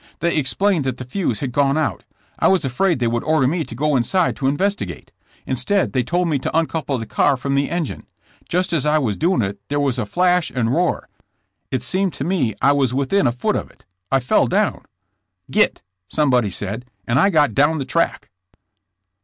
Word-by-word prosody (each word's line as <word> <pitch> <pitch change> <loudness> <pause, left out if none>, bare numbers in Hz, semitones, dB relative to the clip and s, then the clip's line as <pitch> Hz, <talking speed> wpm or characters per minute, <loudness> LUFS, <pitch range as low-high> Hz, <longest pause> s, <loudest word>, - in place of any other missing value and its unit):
They 170 0 0
explained 165 +4 +1
that 130 -2 -2
the 130 - -7
fuse 125 - -2
had 135 - -2
gone 140 +2 +2
out. 155 -2 -1 0.4
I - - +4
was 190 -6 +2
afraid 165 +7 +1
they 125 - -1
would 120 0 0
order 155 -4 +2
me 165 +4 0
to 115 - -9
go 150 +3 +1
inside 170 +8 +1
to 135 - -1
investi 195 +9 0
gate. - - -10 0.3
Instead 200 -2 0
they 130 - +2
told 175 +8 0
me 150 -4 0
to 155 - -2
uncouple 160 -4 -1
the 115 - -5
car 140 +5 +2
from 140 +2 -2
the 140 0 +1
engine. 170 -4 -4 0.4
Just 180 0 0
as 155 -5 +2
I 150 +1 +3
was 120 -9 0
doing 170 - +1
it 100 0 -4
there 145 0 -1
was 140 -4 0
a 105 - -2
flash 180 - +2
and 120 -1 -1
roar. 175 +4 0 0.6
It - - -2
seemed 190 -1 0
to - - -5
me 150 - 0
I - - +6
was 135 -3 +1
within 140 +5 +2
a - - +2
foot 125 +1 -1
of - - -3
it! - - -24 0.3
I 135 - +4
fell 125 - +2
down. - - 0 0.3
" - - -26
'Git!' - - +2 0.2
somebody 125 -7 +2
said, 105 +5 -5 0.2
and 120 +3 +1
I 195 - +5
got 150 - +3
down 145 +5 +3
the 135 - -3
track!" 165 +4 -1
145 Hz, 210 wpm, -20 LUFS, 125-170 Hz, 0.6 s, I